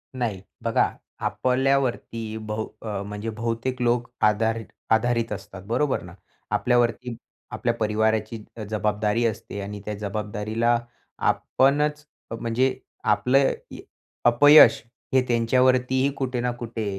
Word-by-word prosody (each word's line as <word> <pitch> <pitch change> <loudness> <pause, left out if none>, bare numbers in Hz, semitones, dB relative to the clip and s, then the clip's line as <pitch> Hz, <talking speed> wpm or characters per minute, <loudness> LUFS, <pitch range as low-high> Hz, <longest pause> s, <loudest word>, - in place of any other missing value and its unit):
नाही. 115 -7 -2 0.2
बघा, - - +2 0.4
आपल्यावरती 125 -4 0
बहु 110 0 -4 0.2
अ, 105 -3 -4
म्हणजे 105 +2 -5
बहुतेक 115 +3 -3
लोक 120 0 +1 0.2
आधार 110 +2 +2 0.3
आधारित 115 0 +2
असतात, 95 -2 -7
बरोबर 130 +4 0
ना. 90 -1 -11 0.4
आपल्यावरती 120 0 +1 0.4
आपल्या 120 -1 -1
परिवाराची 110 0 0
अ, 110 - -5
जबाबदारी 105 +1 0
असते 100 -2 -3
आणि 100 0 -6
त्या 105 - -3
जबाबदारीला 105 +3 -1 0.4
आपणच, 150 +2 +1 0.3
म्हणजे 125 +3 0 0.3
आपलं 135 +2 +3 0.2
य - - -9 0.5
अपयश 145 +6 +8 0.3
हे 130 - +5
त्यांच्यावरतीही 130 +3 +2
कुठे 130 -2 -2
ना, 125 0 0
कुठे 120 -2 -5
115 Hz, 115 wpm, -24 LUFS, 110-125 Hz, 0.5 s, अपयश